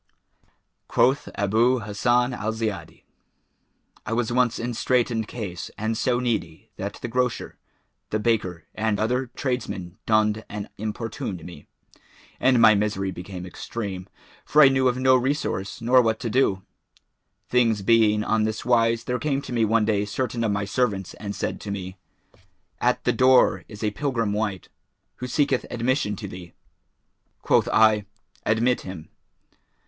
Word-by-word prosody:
Quoth 135 +3 +2
Abъ 110 +4 +2
Hassбn 120 +4 +1
al 110 0 -2
Ziyбdi[FN#417]: 105 -7 -4 1.0
"I 110 - -1
was 120 0 0
once 125 -1 +2
in 120 +1 -3
straitened 115 -2 0
case 100 -7 -6
and 110 +1 -1
so 120 +2 +1
needy 110 -10 -3
that - - -4
the - - -1
grocer, 125 0 -1 0.5
the 110 - 0
baker 95 -7 -1
and 110 -1 -1
other 125 +4 0
tradesmen 110 -9 -4
dunned 110 0 +2
and 105 0 -6
importuned 105 -5 -4
me; 85 -5 -11 0.7
and 130 -1 +4
my 110 -1 +8
misery 100 -2 0
became 90 0 -7
extreme, 95 0 -6 0.4
for 150 0 +5
I 135 - +8
knew 130 -1 +2
of 125 0 +1
no 130 0 +4
resource 125 -7 -1
nor 125 +2 +5
what 110 -2 0
to 115 - -3
do. 100 -7 +2 0.8
Things 115 -5 +2
being 105 -1 +4
on 110 0 +1
this 110 0 -2
wise 115 -1 +3
there 125 0 -2
came 140 -3 0
to - - -6
me 115 -2 +2
one 110 0 +2
day 105 -2 +1
certain 115 +2 -2
of 110 - +1
my 100 0 -1
servants 100 -3 -1
and 100 -1 -5
said - - -3
to 105 - -7
me, 95 -2 -5 0.8
'At - - +1
the - - +2
door 130 0 +4
is 105 0 -9
a 105 - +1
pilgrim 115 -4 -1
wight, 105 -3 -2 0.5
who 125 - -5
seeketh 140 -1 +1
admission 120 -2 0
to 100 +1 -7
thee.' 90 -2 -10 0.9
Quoth - - +3
I, 110 -2 +4 0.4
'Admit 120 +3 +2
him.' 90 -4 -9
110 Hz, 155 wpm, -24 LUFS, 100-125 Hz, 1.0 s, my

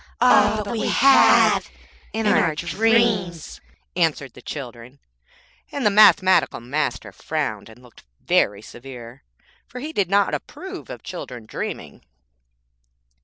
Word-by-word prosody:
'Ah! 215 -3 +4
but 200 - -6
we 225 - -2
have, 275 0 +4 0.4
in 225 0 -3
our 170 -6 +2
dreams,' 195 -1 0 0.3
answered 155 -7 -1
the - - -14
children; 125 -2 -9 0.7
and 280 - -4
the 210 - +4
Mathematical 200 -2 +4
Master 135 +6 -3
frowned 140 -10 -4
and 115 +3 -17
looked 125 - -18 0.2
very 100 +1 0
severe, 120 +1 -12 0.5
for 250 - -9
he 305 +5 -7
did 195 - -1
not 200 +1 +2
approve 380 0 -8
of - - -9
children 125 -10 -8
dreaming. - - -7
175 Hz, 120 wpm, -21 LUFS, -, 0.7 s, Ah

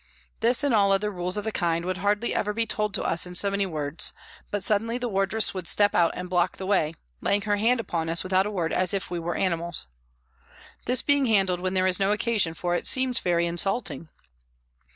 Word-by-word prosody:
This 240 +4 +2
and 285 -4 +1
all 200 -2 +4
other 205 +2 +1
rules 180 +1 -1
of 210 - -2
the 220 - -2
kind 170 -3 -1
would 185 0 -2
hardly 205 +4 0
ever 210 0 -1
be 230 +1 0
told 210 -1 -1
to - - 0
us 170 - +2
in 180 - -9
so 200 +2 +3
many 200 0 0
words, 150 -2 -2 0.4
but 205 -2 -3
suddenly 225 +4 +1
the 250 0 -3
wardress 200 +1 +1
would 185 -3 -6
step 205 0 +3
out 170 -1 +4
and 180 - -5
block 180 0 0
the 190 - -6
way, 175 -5 +1 0.3
laying 205 +1 +1
her 205 -1 0
hand 235 +4 +2
upon 165 -7 -3
us 165 +1 0
without 185 +1 +1
a - - -3
word 175 -6 -2
as 185 +1 +1
if 195 - -4
we 175 - -2
were 170 +1 -3
animals. 170 -3 -1 1.0
This 250 +2 +2
being 285 -2 +2
handled 195 -5 +2
when 185 +1 -2
there 185 0 +2
is 185 0 +2
no 195 +1 +2
occasion 210 -6 0
for 175 +1 -2
it 175 - -1
seems 260 -1 +2
very 170 -1 +1
insulting. 170 - -2
195 Hz, 225 wpm, -25 LUFS, 175-210 Hz, 1.0 s, all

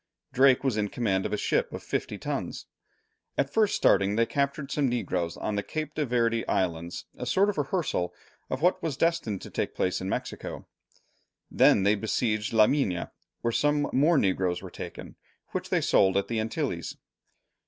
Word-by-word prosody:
Drake 130 0 +5
was 130 -5 +1
in 105 -1 +1
command 95 -4 0
of - - -9
a - - 0
ship - - 0
of - - -7
fifty - - -3
tons. - - -4 0.7
At 140 +1 0
first 215 -2 +3
starting 100 +1 +3
they 115 +1 +3
captured 140 +2 -2
some 140 -3 +1
negroes 90 -8 -2
on 105 - -2
the 100 - 0
Cape 155 +6 -4
de 150 -3 -1
Verd 115 -1 +1
Islands, 85 -2 -1
a 125 - -4
sort 195 - +3
of 195 - -13
rehearsal 140 - -1 0.4
of 130 +4 -3
what 180 - +3
was 155 -5 -2
destined 165 - 0
to - - -9
take - - -2
place 90 - 0
in 95 - -3
Mexico. - - -4 0.9
Then 95 - +5
they 100 +2 +4
besieged 110 0 -1
La 110 -2 +6
Mina, 105 -10 0 0.3
where 115 - 0
some 145 +3 +1
more 150 +5 +4
negroes 95 -5 +1
were - - -8
taken, - - -8 0.3
which - - -4
they - - +2
sold 95 0 +3
at 100 - -1
the 115 -1 0
Antilles. 110 0 -3
115 Hz, 180 wpm, -27 LUFS, 100-140 Hz, 0.9 s, La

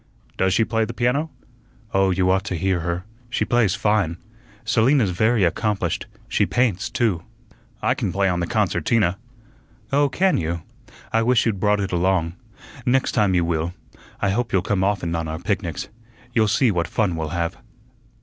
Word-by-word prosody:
"Does 95 -1 +2
she 115 - +3
play 115 0 0
the 115 +1 -5
piano?" 125 +7 +1 0.6
"Oh, 95 0 +3
you 90 0 +2
ought 95 +1 +2
to 95 - -2
hear 95 +2 0
her. 85 +2 -3 0.2
She 125 - 0
plays 120 -6 +2
fine. 105 -6 +1 0.5
Selina's 115 0 +3
very 110 +4 +2
accomplished. 100 0 0 0.2
She 105 - +1
paints, 115 -7 +1
too." 105 -9 0 0.6
"I 125 - +3
can 115 -8 -2
play 100 +2 +1
on 90 -2 0
the 85 - -1
concertina." 100 -2 +1 0.7
"Oh, 145 0 +4
can 185 +6 +2
you? 85 0 -3 0.5
I 115 - +3
wish 120 +1 +3
you'd 110 -5 0
brought 105 +1 +2
it 95 - -2
along. 90 -1 +1 0.5
Next 130 +2 +2
time 105 -5 +2
you 85 -1 +2
will. 85 +1 -1 0.4
I 100 - +1
hope 120 +4 -1
you'll 95 -2 +2
come 100 -1 0
often 95 -4 0
on 80 -1 -2
our 80 +1 -4
picnics. 90 -3 -2 0.5
You'll 110 -2 +3
see 125 +2 +3
what 85 -5 0
fun 100 -2 0
we'll 80 -1 -3
have." 85 +2 -2
95 Hz, 175 wpm, -22 LUFS, 85-115 Hz, 0.7 s, Oh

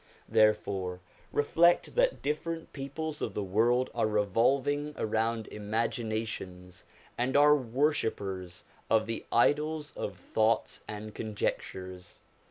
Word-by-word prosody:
Therefore 100 -4 +2 0.3
reflect 170 +4 +3
that - - +2
different 165 +3 -3
peoples 150 +2 -5
of - - -3
the 105 - -1
world 115 +6 +2
are 115 -2 +1
revolving 130 +8 +1
around 110 0 0
imaginations, 110 -4 -3 0.3
and 130 +3 +2
are 150 +1 +7
worshippers 110 - -1 0.3
of 110 -1 +3
the 115 0 -4
idols 150 +4 +2
of 100 -3 -4
thoughts 110 +4 0
and 105 0 -7
conjectures. 95 -4 -4
115 Hz, 105 wpm, -30 LUFS, 105-145 Hz, 0.3 s, are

